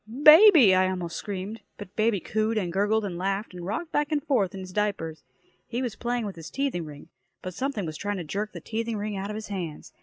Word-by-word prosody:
"Baby!" 310 - +9
I 185 0 +4
almost 175 -2 -4
screamed. 205 +3 -5 0.2
But 205 -2 -10
baby 215 -2 +2
cooed 220 +4 -1
and 180 -5 -1
gurgled 205 +3 +2
and 175 -3 -4
laughed 195 +2 -2
and 180 -1 -8
rocked 225 - -4
back 295 +1 0
and 295 -2 0
forth 200 -10 +1
on 190 - -6
his 185 0 -9
diapers. 190 -7 -2 0.4
He 245 +2 -2
was 235 -4 -3
playing 240 -1 -2
with 195 -4 -6
his 165 -1 -8
teething 275 -11 -2
ring, 145 -1 -11 0.3
but 185 - -5
something 255 -3 -2
was 155 -1 -5
trying 205 +2 -3
to 180 - -4
jerk 205 +7 -3
the - - -9
teething 225 0 -3
ring 210 0 -3
out 195 +1 -4
of 210 - -4
his 215 0 -6
hands. 175 -6 -6
205 Hz, 235 wpm, -26 LUFS, 185-225 Hz, 0.4 s, Baby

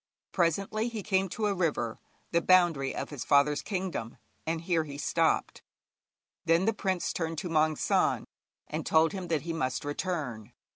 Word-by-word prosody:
Presently 195 +6 +1
he 220 -3 -5
came 190 -1 +1
to 215 +4 -2
a 205 - +2
river, 150 -11 -1 0.3
the 170 - +3
boundary 170 -7 +3
of - - -4
his 140 -4 -5
father's 145 +1 +3
kingdom, 180 - -4 0.3
and 165 0 -1
here 170 -2 +1
he 145 -2 -8
stopped. - - +1 0.8
Then 165 +3 +3
the 225 - +2
prince 190 -3 -1
turned 165 -1 -2
to 180 +2 -3
Maung 155 -1 +3
San, - - +2 0.4
and - - -3
told 160 0 +4
him 190 -2 -5
that 160 -4 0
he 165 0 -3
must 130 -4 -2
return. 145 - -3
165 Hz, 165 wpm, -29 LUFS, 145-185 Hz, 0.8 s, told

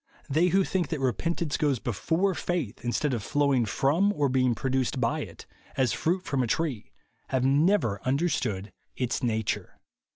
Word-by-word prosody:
They 160 +6 +3
who 190 +2 +3
think 185 -1 -1
that 160 - -3
repentance 145 - -1
goes 145 -4 +1
be 120 - -3
fore 170 - +1
faith, 170 - -3
instead 130 +4 0
of 115 - -1
flowing 140 -1 +1
from 160 - +2
or 145 -5 +1
being 130 -2 +2
produced 130 0 -1
by 115 -2 +1
it, - - -8 0.3
as 130 -3 +2
fruit 180 +3 0
from 140 -5 -1
a 125 - 0
tree, 135 -3 -2 0.4
have 130 -1 0
never 140 - +3
understood 130 - -1 0.2
its 125 +1 -1
nature." 110 -4 -2
135 Hz, 165 wpm, -27 LUFS, 120-165 Hz, 0.4 s, They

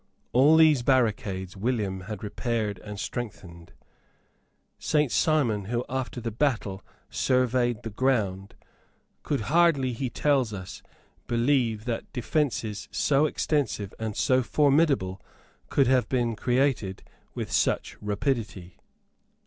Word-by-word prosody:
All 145 +6 +6
these 155 -5 +5
barricades 105 -8 0
William 100 -3 -2
had 105 -2 -6
repaired 105 -1 -2
and 105 -1 -8
strengthened. 85 -8 -6 1.1
Saint 150 -4 +1
Simon, 125 - +1
who, 120 +4 -2
after 130 -1 -3
the 115 -1 -4
battle, 110 -6 -1 0.3
surveyed 125 -2 +1
the 115 - -5
ground, 100 -6 -1 0.7
could 140 -5 -2
hardly, 140 -1 +3
he 130 +2 -3
tells 135 -5 +1
us, 95 -2 -8 0.5
believe 120 -3 +1
that 120 -2 -4
defences 120 -5 -2
so 145 +2 +2
extensive 135 -10 -1
and 110 -2 -4
so 130 0 +3
formidable 140 - +2 0.5
could 140 - +3
have 130 0 +2
been 120 -3 0
created 125 -5 0 0.3
with - - -4
such - - 0
rapidity. 105 -4 -3
120 Hz, 115 wpm, -26 LUFS, 105-135 Hz, 1.1 s, All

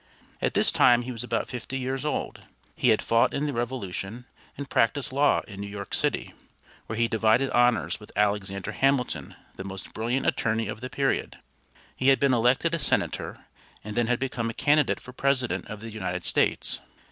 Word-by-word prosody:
At - - 0
this - - +4
time 120 0 +5
he 130 - -5
was 115 -2 -5
about 125 - -1
fifty 125 +1 -5
years 130 +1 -2
old. 150 - -3 0.3
He 125 - +2
had 110 - +3
fought 115 0 +3
in 145 - 0
the 145 - -2
Revolution, 120 -2 -4 0.3
and 140 0 -5
practiced 130 +3 +1
law 145 +2 +3
in 100 -2 -10
New 100 - -4
York 100 0 -7
City, - - -1 0.5
where 110 - -4
he 115 0 +3
divided 110 +3 +2
honors 120 -2 +2
with 105 - -13
Alexander 100 -1 0
Hamilton, 135 +1 0 0.2
the 95 - -5
most 95 0 -8
brilliant 120 +4 -1
attorney 115 0 +1
of 110 - -6
the 130 - -5
period. 135 0 -1 0.6
He 130 - -1
had 135 -1 +6
been 140 -2 +3
elected 125 +8 +2
a 170 - 0
senator, 135 - -1 0.4
and 105 0 -6
then 120 -1 +2
had 125 0 +2
become 120 -3 -2
a 115 - -6
candidate 145 0 +3
for 125 - -12
President 130 -2 0
of 105 -1 -7
the 115 0 -7
United 90 -4 -3
States. - - +2
120 Hz, 190 wpm, -26 LUFS, 110-130 Hz, 0.6 s, had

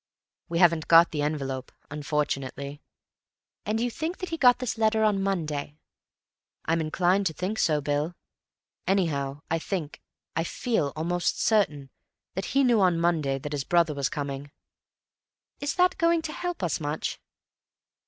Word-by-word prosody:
"We 170 - -1
haven't 170 -2 +4
got 165 +1 +7
the 150 - -2
envelope, 135 -3 -3 0.2
unfortunately." 145 -1 -3 0.9
"And 215 +1 0
you 240 +1 0
think 330 +6 -3
that 370 - -5
he 330 - -2
got 250 -4 +6
this 250 -2 -2
letter 220 0 +3
on 210 -2 +2
Monday." 155 -7 -2 0.9
"I'm 165 +1 +1
inclined 180 +5 +2
to 160 - -3
think 185 +7 -3
so, 150 -2 +2
Bill. 145 +4 -1 0.7
Anyhow, 145 -7 0
I 165 - +2
think—I 165 -2 -5
feel 175 - -1
almost 175 +3 -1
certain—that 180 - -1
he 275 +1 +2
knew 240 -5 +4
on 180 -3 +3
Monday 160 -5 +1
that 145 +2 -6
his 140 -2 -1
brother 170 0 +2
was 140 -2 -1
coming." 140 0 -4 1.1
"Is 285 -1 -2
that 365 0 +3
going 335 -1 +3
to 310 -1 -4
help 355 - -4
us 170 - 0
much?" 150 0 -3
165 Hz, 145 wpm, -27 LUFS, 145-215 Hz, 1.1 s, got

